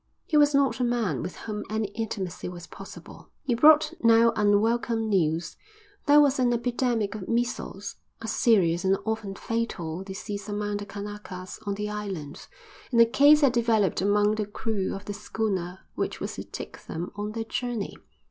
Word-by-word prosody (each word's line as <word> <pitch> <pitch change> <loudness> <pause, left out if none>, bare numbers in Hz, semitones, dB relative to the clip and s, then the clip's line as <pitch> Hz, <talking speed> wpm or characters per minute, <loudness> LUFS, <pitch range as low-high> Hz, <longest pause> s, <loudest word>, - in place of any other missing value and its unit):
He 310 - -2
was 295 -1 +5
not 275 -1 +2
a - - +1
man 230 - 0
with 180 +2 -5
whom 210 -1 -5
any 215 -1 -1
intimacy 200 -5 -4
was 175 -1 -9
possible. - - -12
He 260 - 0
brought 300 +5 +6
now 230 0 +6
unwelcome 225 +2 +2
news. 170 -5 0 0.5
There 295 +1 +7
was 285 -2 +4
an 245 -1 +3
epidemic 235 -3 0
of 210 -4 -7
measles, 230 -4 -2 0.2
a 225 - -6
serious 185 -7 +3
and 190 +1 +3
often 220 -3 -3
fatal 190 -8 -3
disease 200 +1 -6
among 205 0 -2
the 205 0 -7
Kanakas, 200 -3 -7
on 200 - 0
the 210 +1 -3
island, 190 -9 -6 0.4
and 235 - +3
a 230 - +9
case 285 +6 +6
had 275 -4 +4
developed 225 -6 +2
among 205 +1 +3
the 215 -1 -2
crew 205 -2 -2
of 195 - -8
the 205 - -4
schooner 195 -4 -3
which - - -3
was - - -4
to - - -7
take - - -8
them 170 +2 -5
on 210 +1 -4
their 225 0 -2
journey. 235 -2 -3
210 Hz, 175 wpm, -27 LUFS, 195-235 Hz, 0.5 s, a